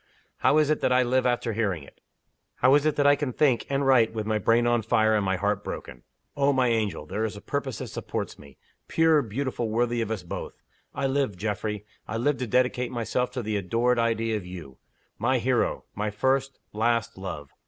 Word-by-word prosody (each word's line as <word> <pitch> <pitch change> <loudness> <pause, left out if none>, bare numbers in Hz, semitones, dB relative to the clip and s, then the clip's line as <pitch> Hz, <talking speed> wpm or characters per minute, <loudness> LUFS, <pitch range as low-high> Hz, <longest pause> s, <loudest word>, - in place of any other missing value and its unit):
How 150 - +3
is 155 -1 +3
it 155 - 0
that - - +2
I 125 0 +4
live 130 +1 +2
after 120 -2 0
hearing 100 -8 -1
it? - - -17 0.5
How 130 - +4
is 145 +1 +4
it 155 - +1
that 145 - +1
I 145 0 +7
can 145 -2 -2
think, 130 -2 +2
and 140 0 0
write, 120 -4 +4
with 110 -1 -2
my 110 0 0
brain 115 +3 +3
on 120 -1 +2
fire, 110 0 +2
and 105 - +1
my 95 -1 +1
heart 100 +2 -1
broken! - - -7 0.3
Oh, 140 0 +3
my 130 -3 +2
angel, 105 -9 -1
there 105 +8 -3
is 110 -2 -3
a - - -7
purpose 135 0 -3
that - - -5
supports - - -5
me 70 -2 -15 0.3
pure, 160 -2 +4
beautiful, 120 0 -3
worthy 120 +1 0
of 115 - -2
us 110 -5 -3
both. 85 - -7 0.4
I 140 - -1
live, 135 -7 0
Geoffrey 105 +1 -3 0.2
I 110 - -3
live 135 +4 +1
to 125 - -2
dedicate 125 +1 +1
myself 120 +1 -1
to 125 -2 -3
the 110 -1 -1
adored 115 +6 +1
idea 115 -1 +1
of 105 - -6
You. 85 -8 -9 0.4
My - - +2
hero! - - 0
my 105 +1 -2
first, 135 +5 0 0.2
last, 115 +1 0
love! 85 -7 -7
115 Hz, 215 wpm, -26 LUFS, 105-130 Hz, 0.5 s, I